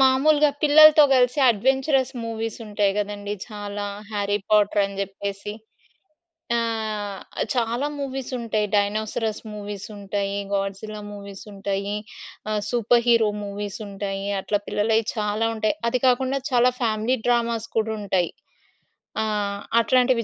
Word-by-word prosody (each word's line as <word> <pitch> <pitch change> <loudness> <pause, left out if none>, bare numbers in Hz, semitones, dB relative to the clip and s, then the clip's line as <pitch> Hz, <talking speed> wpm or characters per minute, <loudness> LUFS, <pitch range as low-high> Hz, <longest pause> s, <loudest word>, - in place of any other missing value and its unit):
మాములుగా 290 +3 +5
పిల్లలతో 310 +1 +8
గలిసి 250 +2 +3
అడ్వెంచరస్ 265 +4 +1
మూవీస్ 225 -1 -4
ఉంటాయి 205 -1 +1
గదండీ! 205 0 -3 0.2
చాలా, 205 -1 -5 0.3
'హ్యారీ 205 -1 0
పాటర్' 210 -1 +4
అని 195 0 -8
చెప్పేసి 200 +1 -5 1.0
ఆహ్, 215 -3 -2 0.3
చాలా 240 +3 0
మూవీస్ 270 -2 -4
ఉంటాయి. 220 -3 -1
డైనోసారస్ 215 +1 0
మూవీస్ 205 -1 -6
ఉంటాయి, 200 0 -2 0.2
గాడ్‌జిల్లా 200 +2 -3
మూవీస్ 200 -1 -9
ఉంటాయి, 200 0 -3 0.6
ఆహ్, 210 -1 0
సూపర్ 240 0 +3
హీరో 230 -2 +5 0.2
మూవీస్ 200 0 -5
ఉంటాయి. 195 0 -4 0.2
అట్లా 205 +2 0
పిల్లలయి 220 +2 +2
చాలా 210 +1 0
ఉంటాయి. 215 +4 0
అది 250 - +1
కాకుండా 260 +2 +2
చాలా 250 0 +4
ఫ్యామిలీ 225 +2 +1
డ్రామాస్ 235 -2 +1
కూడా 220 0 +1
ఉంటాయి. 190 -4 0 0.9
ఆ! - - +1 0.6
అట్లాంటివి 250 0 +3
215 Hz, 120 wpm, -24 LUFS, 205-245 Hz, 1.0 s, పిల్లలతో